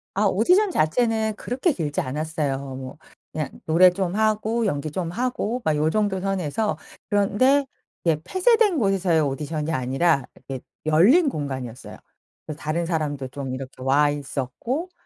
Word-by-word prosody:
아 205 - +2
오디션 360 - +3
자체는 220 - +1
그렇게 265 +8 0
길지 150 - -2
않았어요. 150 0 -2 0.2
뭐 130 +2 -8 0.3
그냥 150 -3 -3 0.2
노래 175 +3 +6
좀 185 -1 -2
하고 220 +1 +1
연기 145 -4 -2
좀 170 0 -3
하고 245 +2 -2
막 155 - +1
요 155 +1 +2
정도 205 -1 0
선에서. 190 -1 -1 0.3
그런데 240 +8 +3 0.4
예, 160 -2 +4
폐쇄된 405 - +3
곳에서의 195 - +2
오디션이 150 +2 -2
아니라 135 +2 +1
이게 135 -2 -7 0.3
열린 230 - +5
공간이었어요. 130 - -6 0.5
그래서 155 0 -7
다른 165 +3 -1
사람도 145 -5 -2
좀 135 -1 -5
이렇게 130 0 -7
와 145 +3 +3
있었고 145 - -4
165 Hz, 320 characters per minute, -24 LUFS, 145-220 Hz, 0.5 s, 노래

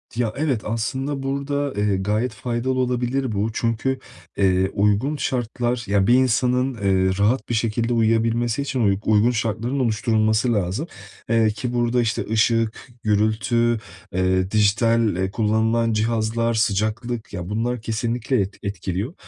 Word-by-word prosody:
Ya, 115 -2 -1
evet 140 -7 0
aslında 130 +5 -2
burada, 140 +1 -2
eee, 105 -1 +1
gayet 105 +5 -1
faydalı 130 +1 -2
olabilir 125 +1 0
bu. 105 +1 0
Çünkü, 115 +4 -1 0.4
eee, 95 -1 +2
uygun 105 +8 +1
şartlar, 120 -2 -2
ya, 100 -1 +2
bir 120 - +5
insanın, 125 +1 +2
eee, 95 -4 +1
rahat 110 +6 +1
bir - - 0
şekilde 115 +1 0
uyuyabilmesi 115 +1 +1
için 140 -2 -2
uy 100 -1 +3
uygun 110 +2 +4
şartların 115 +3 -2
oluşturulması 110 -1 +1
lazım, 100 - -1 0.4
eee, 115 -1 +3
ki 115 +4 -4
burada 120 0 +1
işte 115 -2 -1
ışık, 115 +1 +1 0.2
gürültü, 110 +2 +1 0.3
eee, 95 +1 +1
dijital, 110 0 +2
eee, 95 +1 -1
kullanılan 110 +1 +1
cihazlar, 115 +1 0
sıcaklık 110 +2 -1
ya, 90 -2 -5
bunlar 115 +3 -2
kesinlikle 115 +2 -1
et 95 +1 -4
etkiliyor 100 - -3
115 Hz, 135 wpm, -22 LUFS, 105-125 Hz, 0.4 s, bir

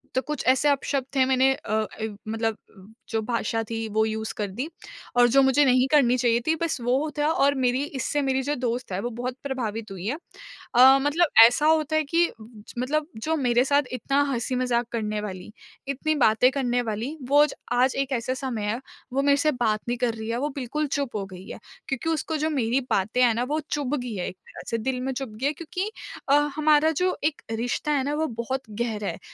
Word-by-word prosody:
तो 260 - +2
कुछ 300 -1 -4
ऐसे 265 +3 +4
अपशब्द 275 -1 0
थे 265 - +5
मैंने 265 0 +3
अ 215 - -8
अ, 220 0 -2 0.2
मतलब 225 0 -1 0.2
उ 185 - -15 0.3
जो 220 -1 0
भाषा 225 0 -1
थी 225 -1 -3
वो 220 +1 +2
यूज़ 220 0 -3
कर 205 -1 -1
दी 255 +10 -4 0.5
और 245 0 +7
जो 275 +3 +5
मुझे 265 +2 +4
नहीं 255 0 +4
करनी 255 -5 +5
चाहिए 235 -1 +2
थी 320 - +3
बस 330 -5 -1
वो 265 +6 +1
था 295 - +2
और 280 -2 +3
मेरी 250 +3 +2
इससे 290 +1 -2
मेरी 265 -1 +1
जो 290 +2 -1
दोस्त 245 -3 -3
है 185 - -1
वो 240 - -2
बहुत 245 +1 -4
प्रभावित 225 -6 -4
हुई 190 0 -7
है। 285 +6 -1 0.6
अ, 265 +2 +8
मतलब 310 +4 +2 0.2
ऐसा 270 +5 0
होता 315 -1 +2
है 310 - +2
कि 335 +4 +3 0.2
ज 215 -1 -13
मतलब 300 +4 0 0.2
जो 320 +1 0
मेरे 245 -2 +3
साथ 285 +1 +3
इतना 275 +4 +1
हँसी-मज़ाक 245 -1 0
करने 215 -2 -2
वाली, 190 -1 -7 0.4
इतनी 305 +3 -1
बातें 245 -1 +4
करने 245 -3 0
वाली, 230 +7 -4
वो 290 +1 +6
ज - - -7 0.2
आज 250 +2 +3
एक 275 0 -1
ऐसा 245 +1 -1
समय 250 -5 -4
है 235 - -3 0.3
वो 275 - +2
मेरे 280 0 +4
से 305 +1 +2
बात 220 -4 0
नहीं 240 0 -1
कर 240 -2 0
रही 220 0 -6
है, 230 - -1
वो 290 +4 -1
बिल्कुल 290 +3 -2
चुप 275 -5 -2
हो 200 -2 -2
गई 185 0 -11
है। - - -8 0.3
क्योंकि 270 +4 -2
उसको 320 0 -1
जो 310 +1 0
मेरी 260 -2 +1
बातें 215 +6 +1
हैं 235 -2 +5
ना 240 - 0
वो 305 +1 0
चुभ 290 -1 -1
गई 245 -3 -5
है 180 - -3
एक 185 - -12
तरह - - -11
से 230 - +1
दिल 250 +2 -2
में 265 +1 -2
चुभ 250 -5 -6
गई - - 0
है। 300 - 0
क्योंकि 360 +7 -4 0.4
अ, - - +5 0.2
हमारा 310 +1 +4
जो 365 +4 0
एक 305 -1 0
रिश्ता 245 +6 -2
है 275 -3 +1
ना 290 +2 -1
वो 315 +1 0
बहुत 265 +3 -3 0.2
गहरा 215 -4 -2
है - - -4
255 Hz, 225 wpm, -25 LUFS, 230-285 Hz, 0.6 s, अ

